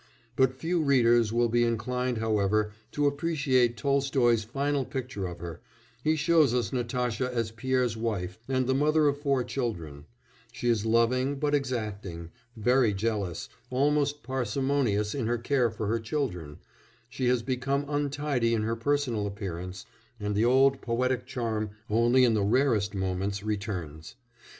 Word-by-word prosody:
But 130 Hz, -1 st, +2 dB
few 165 Hz, +4 st, 0 dB
readers 120 Hz, -6 st, +4 dB
will 120 Hz, +1 st, +2 dB
be 120 Hz, +1 st, +2 dB
inclined, 120 Hz, +2 st, -1 dB
however, 105 Hz, -1 st, +1 dB, 0.2 s
to 145 Hz, -, +1 dB
appreciate 140 Hz, -5 st, +1 dB
Tolstoy's 135 Hz, -3 st, +2 dB
final 140 Hz, +5 st, -1 dB
picture 125 Hz, -7 st, -4 dB
of 90 Hz, -1 st, -7 dB
her; 85 Hz, -2 st, -7 dB, 0.4 s
he 155 Hz, +1 st, +3 dB
shows 155 Hz, -4 st, +3 dB
us 125 Hz, +2 st, -1 dB
Natasha 125 Hz, 0 st, -1 dB
as 115 Hz, -3 st, -2 dB
Pierre's 125 Hz, 0 st, 0 dB
wife 105 Hz, -5 st, -3 dB
and 130 Hz, -1 st, +1 dB
the 130 Hz, -, +1 dB
mother 150 Hz, +2 st, +3 dB
of 145 Hz, 0 st, 0 dB
four 140 Hz, -3 st, +1 dB
children; 85 Hz, -, -4 dB, 0.5 s
she 120 Hz, 0 st, -4 dB
is 115 Hz, -2 st, +1 dB
loving 125 Hz, +4 st, +2 dB
but 145 Hz, +1 st, -1 dB
exacting, 105 Hz, -, -3 dB, 0.3 s
very 120 Hz, -1 st, +3 dB
jealous, 100 Hz, -5 st, -2 dB, 0.2 s
almost 145 Hz, +2 st, +1 dB
parsimonious 130 Hz, -4 st, 0 dB
in 130 Hz, -6 st, -2 dB
her 120 Hz, +1 st, +1 dB
care 120 Hz, 0 st, +1 dB
for 110 Hz, 0 st, -5 dB
her 115 Hz, +3 st, 0 dB
children, 110 Hz, -, -3 dB, 0.5 s
she 130 Hz, 0 st, -2 dB
has 125 Hz, -2 st, +2 dB
become 135 Hz, +3 st, -1 dB
untidy 145 Hz, -4 st, 0 dB
in 110 Hz, -, -1 dB
her 115 Hz, +1 st, -1 dB
personal 120 Hz, -4 st, 0 dB
appearance, 90 Hz, -3 st, -6 dB, 0.3 s
and 105 Hz, 0 st, -2 dB
the 105 Hz, +3 st, +2 dB
old 135 Hz, +2 st, +4 dB
poetic 125 Hz, +1 st, -1 dB
charm 115 Hz, -5 st, -2 dB, 0.2 s
only 120 Hz, +4 st, +4 dB
in 120 Hz, -2 st, +4 dB
the 105 Hz, -, +1 dB
rarest 110 Hz, -2 st, +2 dB
moments 95 Hz, +1 st, -2 dB
returns. 95 Hz, -7 st, -4 dB
120 Hz, 150 wpm, -28 LUFS, 105-135 Hz, 0.5 s, readers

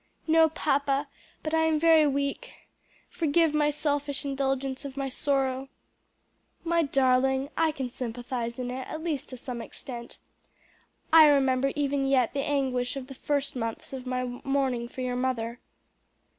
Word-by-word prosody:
"No, 320 Hz, 0 st, +5 dB
papa, 280 Hz, -2 st, 0 dB, 0.4 s
but 310 Hz, -, -3 dB
I 320 Hz, 0 st, +3 dB
am 320 Hz, -1 st, +2 dB
very 320 Hz, -1 st, +6 dB
weak. 280 Hz, -, -2 dB, 0.6 s
Forgive 325 Hz, 0 st, +2 dB
my 300 Hz, -1 st, +3 dB
selfish 290 Hz, -1 st, -1 dB
indulgence 270 Hz, -1 st, -1 dB
of 275 Hz, -1 st, -8 dB
my 275 Hz, -1 st, -2 dB
sorrow." 270 Hz, -1 st, -1 dB, 0.9 s
"My 335 Hz, 0 st, +2 dB
darling, 265 Hz, -1 st, +2 dB
I 325 Hz, -1 st, +2 dB
can 270 Hz, -4 st, -4 dB
sympathize 240 Hz, -1 st, -4 dB
in 250 Hz, -1 st, -3 dB
it, 260 Hz, 0 st, -5 dB
at 315 Hz, 0 st, -6 dB
least 300 Hz, -5 st, -2 dB
to 255 Hz, -, -7 dB
some 245 Hz, -1 st, -6 dB
extent. 240 Hz, 0 st, -8 dB, 1.0 s
I 320 Hz, -1 st, +10 dB
remember 275 Hz, -2 st, +3 dB
even 280 Hz, -1 st, 0 dB
yet 260 Hz, -4 st, +2 dB
the 280 Hz, -, -2 dB
anguish 265 Hz, -4 st, 0 dB
of 270 Hz, -2 st, -5 dB
the 270 Hz, -, -10 dB
first 285 Hz, +1 st, -2 dB
months 230 Hz, +1 st, -4 dB
of 260 Hz, -1 st, -6 dB
my 255 Hz, 0 st, -1 dB, 0.2 s
mourning 265 Hz, -3 st, 0 dB
for 255 Hz, -, -8 dB
your 250 Hz, -1 st, -1 dB
mother." 245 Hz, -2 st, -2 dB
275 Hz, 155 wpm, -28 LUFS, 255-290 Hz, 1.0 s, I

